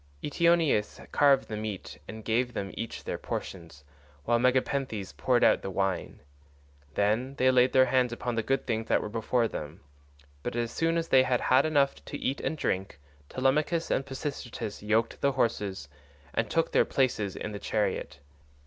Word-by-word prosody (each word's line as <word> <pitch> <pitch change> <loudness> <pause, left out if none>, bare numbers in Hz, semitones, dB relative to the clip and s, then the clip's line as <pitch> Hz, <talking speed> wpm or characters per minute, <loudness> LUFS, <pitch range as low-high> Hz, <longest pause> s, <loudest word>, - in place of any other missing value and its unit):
Eteoneus 165 -7 +2
carved 140 -2 +4
the 110 - -4
meat 105 -9 -6
and 110 0 -9
gave 120 +2 0
them 95 -2 -3
each 115 - -6
their - - -4
portions, 80 -7 -6 0.4
while 120 0 +3
Megapenthes 125 -4 0
poured 125 -2 +2
out - - +5
the - - -4
wine. 95 -2 -2 0.7
Then 110 +7 +1
they 130 -1 +4
laid 125 0 +4
their 130 0 +6
hands 125 -1 +2
upon 120 +1 -3
the 115 - 0
good 135 +5 -1
things 115 -2 -2
that - - +3
were - - -5
before 115 +2 0
them, 75 -5 -7 0.6
but - - -4
as 120 -1 -1
soon 165 +4 +1
as 165 0 -2
they 130 - +6
had 125 -1 +1
had 130 +4 +3
enough 140 -3 +1
to - - -5
eat 135 - -2
and 160 - -2
drink 95 - -2 0.3
Telemachus 150 +6 +1
and 135 - +1
Pisistratus 135 -5 -5
yoked 110 +2 0
the 140 0 +2
horses, 105 - -1 0.5
and - - 0
took - - +1
their - - +5
places 110 -7 0
in 105 - -5
the 100 - -6
chariot. 100 -10 -2
120 Hz, 175 wpm, -28 LUFS, 105-135 Hz, 0.7 s, their